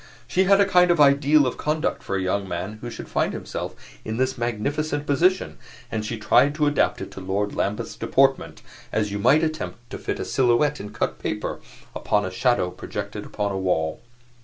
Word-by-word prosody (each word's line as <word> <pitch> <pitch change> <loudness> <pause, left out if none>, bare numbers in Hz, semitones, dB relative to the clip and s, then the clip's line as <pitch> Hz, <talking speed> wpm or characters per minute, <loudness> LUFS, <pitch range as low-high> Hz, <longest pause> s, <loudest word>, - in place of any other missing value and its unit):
She 190 +1 +2
had 195 +1 +5
a 200 - +6
kind 180 -2 +4
of 170 -2 +3
ideal 145 +1 +5
of 125 - -2
conduct 155 +1 -1
for 100 - -3
a 95 - 0
young 95 +1 -1
man 95 +5 -5
who 120 - -5
should - - -8
find - - 0
himself - - -5 0.3
in 110 +1 -4
this 130 +1 0
magnificent 145 +6 -2
position, 175 +7 +1 0.3
and 110 -1 -2
she 115 +2 -4
tried 125 +6 +3
to 150 -1 +1
adapt 145 -1 +1
it - - -6
to - - -9
Lord 100 +2 -1
Lambeth's 105 +3 -2
deportment 135 0 +1 0.3
as 105 -2 0
you 100 - -3
might 135 +9 +4
attempt 155 -6 -4
to - - -6
fit - - -3
a - - -3
silhouette 130 +4 +2
in 105 +1 -7
cut - - -2
paper - - -3 0.4
upon 105 0 0
a 95 - -4
shadow 105 -3 +1
projected - - -6
upon 105 -1 -2
a 95 - -2
wall. 80 -4 0
120 Hz, 200 wpm, -24 LUFS, 105-150 Hz, 0.4 s, a